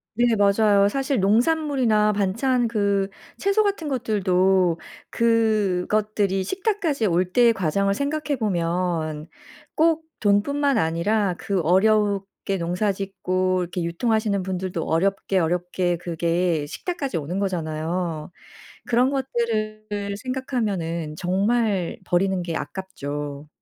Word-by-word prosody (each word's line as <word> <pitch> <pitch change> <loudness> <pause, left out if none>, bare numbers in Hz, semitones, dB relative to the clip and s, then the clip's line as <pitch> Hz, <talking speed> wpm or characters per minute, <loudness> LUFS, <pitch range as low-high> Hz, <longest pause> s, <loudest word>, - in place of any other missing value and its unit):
네 240 +1 +3
맞아요. 200 0 +4
사실 270 +1 -1
농산물이나 230 -1 +2
반찬, 230 +5 +1
그 200 -3 +1 0.3
채소 400 +2 +2
같은 400 -6 -1
것들도 190 - +2 0.3
그것들이 210 -3 +1
식탁까지 355 - -1
올 180 0 +1
때의 240 +1 +5
과정을 195 +1 0
생각해 285 +3 -1
보면 170 -5 -1 0.5
꼭 320 0 +3
돈뿐만 270 +7 +2
아니라 180 +3 +1
그 195 -3 -1
어렵게 195 +2 +1
농사 180 +5 0
짓고 185 -1 -1
이렇게 175 0 -3
유통하시는 205 +3 0
분들도 185 -2 -3
어렵게, 195 +4 0
어렵게 175 +1 0
그게 170 -2 0
식탁까지 280 - -4
오는 165 +5 -3
거잖아요. 165 -3 -2 0.5
그런 245 +3 +3
것들을 215 -6 -2
생각하면은 200 - -3
정말 195 0 0
버리는 190 +1 +1
게 165 -2 -3
아깝죠. 145 -6 -5
200 Hz, 260 characters per minute, -23 LUFS, 180-230 Hz, 0.5 s, 때의